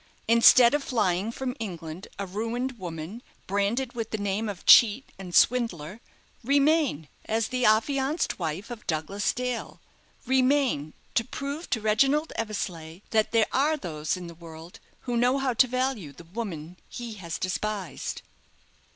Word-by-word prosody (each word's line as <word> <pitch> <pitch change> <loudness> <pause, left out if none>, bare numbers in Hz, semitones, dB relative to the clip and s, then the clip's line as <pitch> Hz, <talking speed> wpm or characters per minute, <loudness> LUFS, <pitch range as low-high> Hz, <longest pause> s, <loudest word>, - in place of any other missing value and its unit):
Instead 235 +2 +7
of 295 -1 +1
flying 210 -4 0
from 255 +1 -4
England, 170 -4 -6
a 200 - -3
ruined 230 +6 -3
woman, 170 +5 -6 0.2
branded 205 +6 -1
with 230 -2 -4
the 220 - -2
name 205 +2 -2
of 195 -3 -7
cheat 235 +2 +7
and 180 -2 -6
swindler, 225 -6 +2 0.4
remain 280 - +2 0.2
as 220 0 0
the 250 -1 0
affianced 270 - +1
wife 170 +7 -4
of 230 -3 -9
Douglas 165 +6 -1
Dale 250 -1 -4 0.5
remain 255 - +2 0.2
to 230 - +2
prove 280 +6 -6
to 225 - 0
Reginald 270 +9 +2
Eversleigh 180 -6 -4
that 220 -1 +2
there 225 -2 +4
are 300 +4 +2
those 155 - -3
in 180 - -7
the 170 - -9
world 165 0 -12 0.2
who 245 -2 -3
know 245 +3 +3
how 270 -2 0
to 255 +3 +4
value 255 - -2
the 140 - -14
woman 175 -3 -6
he 240 -2 -6
has 175 -6 -6
despised." 195 -2 -3
220 Hz, 150 wpm, -27 LUFS, 180-255 Hz, 0.5 s, Instead